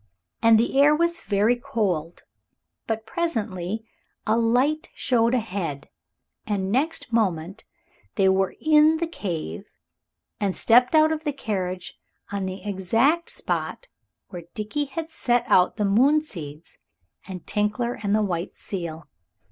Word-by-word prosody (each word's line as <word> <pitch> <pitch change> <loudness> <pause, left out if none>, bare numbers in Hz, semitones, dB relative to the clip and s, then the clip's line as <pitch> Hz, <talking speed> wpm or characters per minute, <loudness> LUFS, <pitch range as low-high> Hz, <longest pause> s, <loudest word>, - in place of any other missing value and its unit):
And 230 0 +6
the 265 +4 +2
air 295 +1 +6
was 340 +2 +1
very 210 +1 +2
cold. 205 - -2 0.6
But 225 0 -2
presently 220 - -3 0.4
a 215 - +2
light 250 +7 +1
showed 235 -1 +2
ahead, 185 - -3 0.6
and 195 -2 -1
next 270 0 0
moment 195 -2 -1 0.5
there 195 - +2
they - - +6
were 190 0 +1
in 310 +1 +5
the 335 - -1
cave, 170 - -5 0.7
and 200 -3 -1
stepped 245 +5 +4
out 310 0 +5
of 315 0 -2
the 295 - 0
carriage 185 -8 -4 0.3
on 200 -2 -2
the 185 0 -6
exact 225 - +1
spot - - -3 0.4
where 175 -3 -8
Dickie 215 +8 -2
had 320 +4 -6
set 245 -4 +1
out 180 - +4
the 210 - 0
moon 255 +10 +4
seeds 165 - -8 0.5
and 185 -2 -8
Tinkler 215 +4 -1
and 205 0 +1
the 215 - +2
white 175 -3 -3
seal. 170 -4 -6
220 Hz, 140 wpm, -24 LUFS, 190-275 Hz, 0.7 s, And